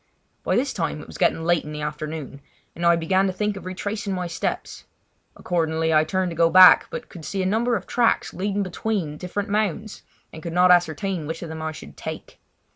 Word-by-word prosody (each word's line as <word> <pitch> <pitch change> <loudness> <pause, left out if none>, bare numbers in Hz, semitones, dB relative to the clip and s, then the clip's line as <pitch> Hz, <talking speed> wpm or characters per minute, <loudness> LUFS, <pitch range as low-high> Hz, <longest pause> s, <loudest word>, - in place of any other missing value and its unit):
By - - 0
this 265 +3 0
time 165 -4 -2
it - - -9
was - - -11
getting 165 - +2
late 175 0 +2
in 150 - -8
the 150 0 -5
afternoon, 150 -1 -5 0.3
and 170 - -6
I 170 - +6
began 185 +4 +1
to - - 0
think 210 +2 -2
of 195 - -9
retracing 205 +2 -3
my 180 -1 -3
steps. 170 - -4 0.5
Accordingly 160 -2 0
I 155 0 +4
turned 185 +2 -1
to - - -6
go 165 0 +4
back, 185 +1 +8
but 240 - -6
could 170 - -11
see 195 +4 -2
a - - -1
number 230 +5 +1
of 200 - -4
tracks 235 -2 +1
leading 200 +2 -1
between 185 -4 -3
different 200 +5 -4
mounds 210 0 -2 0.3
and 160 - -9
could 170 +1 -6
not 180 +1 +5
ascertain 175 -1 +1
which 160 +2 -5
of 170 - -7
them 160 0 -6
I 160 0 -3
should 155 - -12
take. - - -8
180 Hz, 215 wpm, -23 LUFS, 160-200 Hz, 0.5 s, back